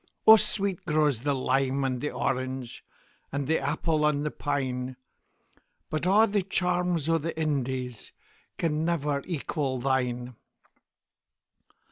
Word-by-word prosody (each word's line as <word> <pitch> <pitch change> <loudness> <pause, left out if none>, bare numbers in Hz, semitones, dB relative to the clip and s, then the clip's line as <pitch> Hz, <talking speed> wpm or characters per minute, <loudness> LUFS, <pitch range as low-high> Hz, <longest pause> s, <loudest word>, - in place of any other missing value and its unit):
O 220 - +11
sweet 200 -3 0
grows 150 -6 +2
the 145 +1 0
lime 135 +1 +1
and 130 -2 -1
the 150 - -1
orange, 130 -2 -3 0.5
And 140 0 -2
the 160 +4 +2
apple 150 +2 0
on 150 -1 +2
the 150 - -2
pine; 130 -3 -2 1.0
But 155 +2 -1
a' 210 +4 +6
the 205 -2 +1
charms 180 -4 0
o' 165 0 +3
the 160 +1 -4
IndiesCan 130 -6 -2 0.7
never 150 -4 0
equal 145 -5 -2
thine. 125 -1 -1
145 Hz, 120 wpm, -27 LUFS, 130-165 Hz, 1.0 s, O